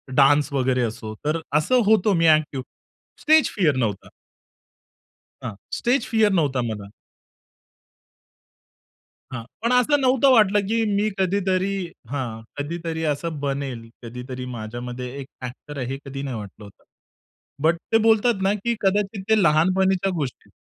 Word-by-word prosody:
Dance 145 +2 +4
वगैरे 130 -1 +1
असो 110 -1 -4
तर 155 +2 +1 0.2
असं 250 +11 +3
होतो 215 -1 +4
मी 165 -1 +3
एक्टिव्ह. 155 -4 +3 0.6
स्टेज 315 -2 +5
फिअर 160 -9 +2
नव्हता. 110 -6 -2 1.3
हां, 110 - -5 0.2
स्टेज 245 +1 +1
फिअर 220 -2 +3
नव्हता 135 -4 0
मला. 100 -2 -6 2.4
हां, 115 -2 -5 0.2
पण 235 +2 +1
असं 285 +4 +4
नव्हतं 260 +1 +4
वाटलं 210 -4 +5
कि 225 +1 +1
मी 210 +2 +1
कधीतरी 190 0 +1 0.4
हां. 120 -5 -4 0.2
कधीतरी 160 +2 -4
असं 150 +1 -2
बनेल. 135 -5 -4
कधीतरी 125 +2 -7
माझ्यामध्ये 120 +3 -6
एक 135 - -7 0.2
एक्टर 140 +3 -9
आहे, 130 - -2
हे 135 +1 -3
कधी 135 0 -6
नाही 130 -5 -4
वाटलं 105 0 -9
होतं. 100 - -17 0.8
बट 165 +2 +3
ते 225 - +6
बोलतात 225 -2 +3
ना, 195 +1 +3
कि 230 +3 -1
कदाचित 195 0 0
ते 220 -2 +4
लहानपणीच्या 185 +4 +3
गोष्टी 140 -6 -5
155 Hz, 135 wpm, -23 LUFS, 130-205 Hz, 2.4 s, ते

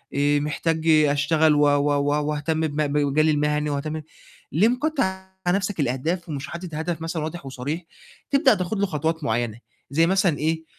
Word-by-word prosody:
آآ 145 +1 +3
محتاج 160 +2 -1
أشتغل 155 0 +4
و - - +2
و 145 0 +3
و 145 +1 +1
وأهتم 155 +2 -1
بم 150 0 -1
بمجالي 150 +2 +2
المهني 150 0 0
وأهتم 155 +2 -3 0.5
ليه 195 +8 +4
مكتّر 280 +3 0
على 190 -1 -3
نَفْسك 195 -3 -3
الأهداف 160 +7 -1
ومش 140 -2 -4
حاطط 170 -2 -7
هدف 160 +1 -3
مثلًا 165 -1 -3
واضح 160 -1 -6
وصريح، 135 +6 -4 0.5
تبدأ 275 -2 +5
تاخُد 185 +2 -3
له 200 - +3
خطوات 160 -2 -2
معيّنة 115 0 -1 0.3
زي 165 +4 +3
مثلًا 185 -4 +2
إيه، 160 +1 -1
155 Hz, 165 wpm, -24 LUFS, 145-175 Hz, 0.5 s, تبدأ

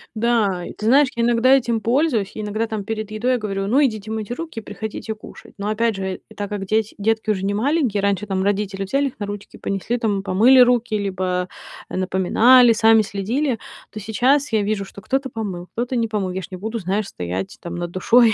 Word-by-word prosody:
Да, 215 -6 +1
ты 215 - -3
знаешь, 275 +4 +6
я 235 - 0
иногда 240 +2 +4
этим 235 -3 +1
пользуюсь, 235 -3 +1
я 215 - -4
иногда 215 +2 -2
там 220 -2 -4
перед 215 0 -4
едой 245 +4 +1
говорю: 195 -3 -3
"Ну, 265 +7 +3
идите 220 -3 -3
мыть 220 -2 -4
руки 320 -1 -5
и - - -9
приходите 220 +1 -6
кушать". 215 - -13
Но, 200 +1 -3
опять 225 +1 +1
же, 190 -1 -4 0.2
так 205 -1 -4
как 205 -2 -4
дети 215 +2 0
детки 220 +1 0
уже 195 -2 0
не 200 - 0
маленькие, 245 -2 +1
раньше 200 0 +1
там 190 -1 -1
родители- 200 -1 -1
взяли 275 +9 0
их 255 - -9
на 205 - -2
ручки, 205 0 -8
понесли 200 +5 -2
там, 210 -5 0
помыли 210 +7 +5
руки 240 -3 +4
либо 185 -2 -2 0.4
напоминали, 220 +7 +5
сами 225 0 +5
следили, 230 +7 -1 0.3
то 215 - -8
сейчас 255 +7 +2
я 215 -2 +2
вижу, 205 -1 -1
что 195 - -11
кто-то 270 +5 -1
помыл, 190 -7 -5
кто-то 245 +2 -3
не 230 -2 0
помыл. 200 -4 -1
Я 190 - -3
ж 180 - -8
не 185 - -6
буду, 220 +4 -4
знаешь, 200 +2 -1
стоять 90 - -5
там 170 0 -6
над 175 0 -4
душой, 225 +5 +4
215 Hz, 210 wpm, -21 LUFS, 195-235 Hz, 0.4 s, знаешь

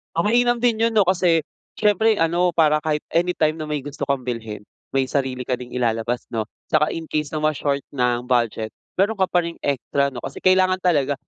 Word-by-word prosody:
Ah, 170 - +1
mainam 240 +2 +3
din 230 -2 +1
yun 230 0 +2
'no, 205 -3 +5
kasi 175 -4 +2 0.3
siyempre 215 +1 +3
ano 170 +2 +2
para 155 -2 +3
kahit 150 -1 -2
anytime 170 -3 +2
na 155 - -5
may 145 -2 -3
gusto 145 -1 -5
kang 135 -3 0
bilhin, 110 -4 -5 0.2
may 135 -1 +1
sarili 130 -2 -2
ka 130 - -1
ding 125 0 -5
ilalabas 120 -1 -1
'no? 110 -1 -2 0.2
'Tsaka 155 0 +2
in 165 -1 -5
case 150 -2 -2
na 155 - -4
ma-short 145 -2 0
ng 125 -2 0
budget, 115 -3 0 0.2
meron 200 +4 +3
ka 190 -3 0
pa 175 -1 +2
ring 170 0 -7
extra 140 0 0
'no, 130 - -10
kasi - - -7
kailangan 185 0 +3
talaga 145 -6 +2
150 Hz, 200 wpm, -22 LUFS, 125-180 Hz, 0.3 s, no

